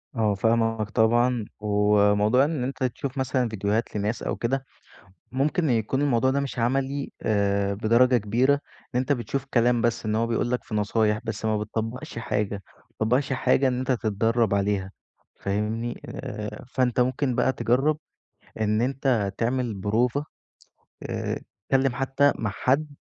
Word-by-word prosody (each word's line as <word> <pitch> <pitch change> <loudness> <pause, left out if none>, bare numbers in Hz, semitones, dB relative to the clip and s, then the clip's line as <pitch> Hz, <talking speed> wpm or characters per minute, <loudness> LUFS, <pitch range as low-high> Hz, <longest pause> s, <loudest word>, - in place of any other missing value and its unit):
آه، 110 -3 +2
فاهمك 115 0 +1
طبعًا، 120 +1 +2
وموضوع 105 +3 +3
إن 150 -5 -2
أنت 130 +1 -3
تشوف 130 +2 -3
مثلًا 130 -2 0
ڤيديوهات 105 +2 -1
لناس 105 +3 -2
أو - - -1
كده 135 +3 -1 0.7
ممكن 150 +4 +1
يكون 120 +3 +1
الموضوع 130 -2 +2
ده 140 - +1
مش 140 -3 -3
عملي 135 +3 0
آآ، 100 -1 +1
بدرجة 120 +4 +4
كبيرة، 120 +6 +2
لإن 140 -2 -5
أنت 130 - -2
بتشوف 135 +1 -1
كلام 120 -1 +3
بس 115 -2 0
إن 110 - 0
هو 115 +1 +1
بيقول 115 +1 0
لك 125 - -1
في 110 - -6
نصايح، 105 +1 +1
بس 110 -1 -4
ما 110 -1 +1
بتطّبقش 115 +3 -4
حاجة 105 -2 -1 0.2
ما - - -28
بتطّبقش 125 +5 0
حاجة 130 +1 +2
إن 125 0 0
أنت 130 +1 -1
تتدرّب 115 -2 +1
عليها، 100 -1 0 0.5
فاهمني؟ 110 +4 -2
آآ، 105 +3 -6
فأنت 125 -2 0
ممكن 130 0 +1
بقى 130 - +2
تجرّب 135 +6 +1 0.6
إن 105 +1 +1
أنت 125 -6 0
تعمل 120 -1 0
بروفة 115 +8 0 0.8
آآ، - - -3 0.3
تتكلّم 135 -1 +2
حتّى 135 +1 +2
مع 105 -3 -1
حد 140 +8 +1
120 Hz, 150 wpm, -25 LUFS, 105-130 Hz, 0.8 s, بدرجة